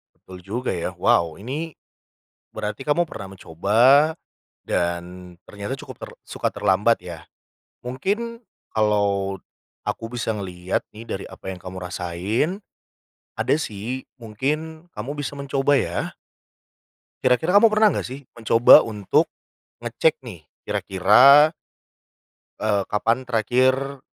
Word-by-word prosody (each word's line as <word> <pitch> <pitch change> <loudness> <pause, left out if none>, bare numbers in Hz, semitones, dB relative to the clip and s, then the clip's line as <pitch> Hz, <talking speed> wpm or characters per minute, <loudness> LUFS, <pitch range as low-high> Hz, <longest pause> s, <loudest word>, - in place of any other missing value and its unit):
Betul 90 -1 -13
juga 115 +6 -3
ya. 90 +1 -3
Wow, 85 -1 +1
ini 150 +9 -5 0.8
berarti 105 +2 -5
kamu 150 +5 +1
pernah 100 -10 -9
mencoba 120 - +4 0.5
dan 90 +1 -3
ternyata 100 +5 -6
cukup - - -10
ter - - -8
suka - - -3
terlambat, 105 +6 +2
ya. 85 -3 -9 0.6
Mungkin 210 - -3 0.3
kalau 100 -2 +1 0.5
aku 115 - -3
bisa 115 -2 -2
ngelihat 90 -2 -3
nih 110 +2 -11
dari 95 - -4
apa - - -12
yang 95 - -8
kamu 95 0 -8
rasain. 90 - -2 0.8
Ada - - +2
sih, 120 -1 -5 0.2
mungkin 150 +9 -3
kamu 130 +8 -6
bisa 145 -1 -4
mencoba, 140 0 0
ya. - - -3 1.1
Kira-kira 145 +9 +2
kamu 220 +2 +7
pernah 215 0 +4
nggak - - -1
sih, 135 - -7
mencoba 115 0 +7
untuk 105 -4 0 0.5
ngecek 130 +4 0
nih 100 -9 -9 0.2
kira-kira 125 - +5 1.1
eee, 105 -2 +1
kapan 115 +5 +1
terakhir 130 +4 +1
115 Hz, 115 wpm, -23 LUFS, 95-140 Hz, 1.1 s, kamu